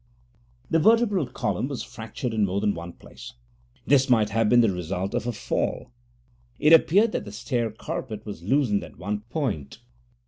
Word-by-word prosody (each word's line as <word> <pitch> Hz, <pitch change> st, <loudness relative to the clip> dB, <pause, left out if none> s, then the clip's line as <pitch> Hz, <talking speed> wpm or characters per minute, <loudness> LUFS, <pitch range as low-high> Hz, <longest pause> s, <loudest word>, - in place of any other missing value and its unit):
The 165 Hz, -, +4 dB
vertebral 210 Hz, -, +3 dB
column 125 Hz, +1 st, -2 dB
was 140 Hz, -3 st, -5 dB
fractured 115 Hz, +2 st, -6 dB
in 110 Hz, -1 st, +1 dB
more 95 Hz, +1 st, -1 dB
than 105 Hz, 0 st, +1 dB
one 85 Hz, +1 st, -8 dB
place. -, -, -12 dB, 0.5 s
This 135 Hz, -1 st, +3 dB
might 110 Hz, -4 st, +3 dB
have 115 Hz, 0 st, +2 dB
been 120 Hz, 0 st, +6 dB
the 115 Hz, -4 st, +3 dB
result 90 Hz, +2 st, -3 dB
of 120 Hz, -, -2 dB
a -, -, 0 dB
fall: 110 Hz, -, -3 dB, 0.7 s
it 150 Hz, +2 st, +5 dB
appeared 200 Hz, +7 st, +5 dB
that -, -, -2 dB
the 100 Hz, -, -9 dB
stair 120 Hz, +2 st, -2 dB
carpet 110 Hz, 0 st, -6 dB
was 105 Hz, -6 st, -7 dB
loosened 105 Hz, 0 st, +1 dB
at -, -, -12 dB
one 105 Hz, +2 st, -3 dB
point. 105 Hz, -, -3 dB
115 Hz, 175 wpm, -25 LUFS, 100-140 Hz, 0.7 s, been